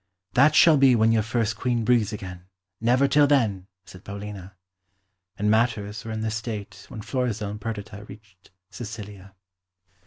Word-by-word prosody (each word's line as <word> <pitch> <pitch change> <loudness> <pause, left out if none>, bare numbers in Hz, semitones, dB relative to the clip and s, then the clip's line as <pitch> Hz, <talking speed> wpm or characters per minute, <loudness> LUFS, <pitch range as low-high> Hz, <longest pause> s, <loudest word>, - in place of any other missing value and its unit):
"That 150 +4 +5
shall 160 -1 +7
be 135 -2 +5
when 110 0 +3
your 115 -1 +3
first 115 0 -1
Queen 120 -1 -1
breathes 110 -3 +2
again 90 -4 -8 0.3
never 125 +4 +3
till 145 +1 +4
then," 110 -10 +1 0.2
said 90 0 -14
Paulina. 100 -2 -8 0.8
And 105 +1 +1
matters 110 -1 0
were 115 - -6
in 110 0 -4
this 110 0 -2
state 110 -2 -7
when 110 - -8
Florizel 115 -6 -2
and 105 0 -8
Perdita 105 -1 -6
reached 100 -3 -16 0.2
Sicilia. 105 -4 -9
110 Hz, 155 wpm, -25 LUFS, 100-120 Hz, 0.8 s, shall